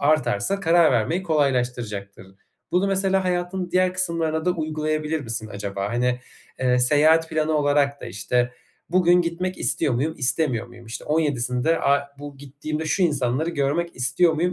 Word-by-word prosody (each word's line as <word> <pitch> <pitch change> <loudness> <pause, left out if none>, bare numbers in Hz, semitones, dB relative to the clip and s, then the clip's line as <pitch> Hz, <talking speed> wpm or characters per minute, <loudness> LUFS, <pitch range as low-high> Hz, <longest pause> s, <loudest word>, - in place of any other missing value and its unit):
artarsa 150 - +1
karar 165 -4 +4
vermeyi 160 - 0
kolaylaştıracaktır. 120 - -1 0.5
Bunu 185 +2 +2
mesela 195 -1 +1
hayatın 180 0 -2
diğer 185 0 +2
kısımlarına 165 -3 -1
da 180 - +2
uygulayabilir 155 -1 -2
misin 110 -3 -5
acaba? 100 0 -4
Hani, 125 +1 0 0.4
eee, 125 -1 +2
seyahat 155 +5 +4
planı 155 0 0
olarak 145 -1 +1
da, - - -7
işte, 120 +5 -1 0.4
"Bugün 180 0 +4
gitmek 180 +2 -3
istiyor 125 +1 0
muyum, 150 +6 -1
istemiyor 130 -2 0
muyum? 120 -1 -15
İşte, 115 - -7
17'sinde 145 -1 0
a 140 0 +2
bu 145 -1 -9
gittiğimde 145 +3 -5
şu 185 +5 0
insanları 145 0 +1
görmek 165 +3 -1
istiyor 135 +7 +2
muyum, 175 +3 0
150 Hz, 150 wpm, -23 LUFS, 125-170 Hz, 0.5 s, karar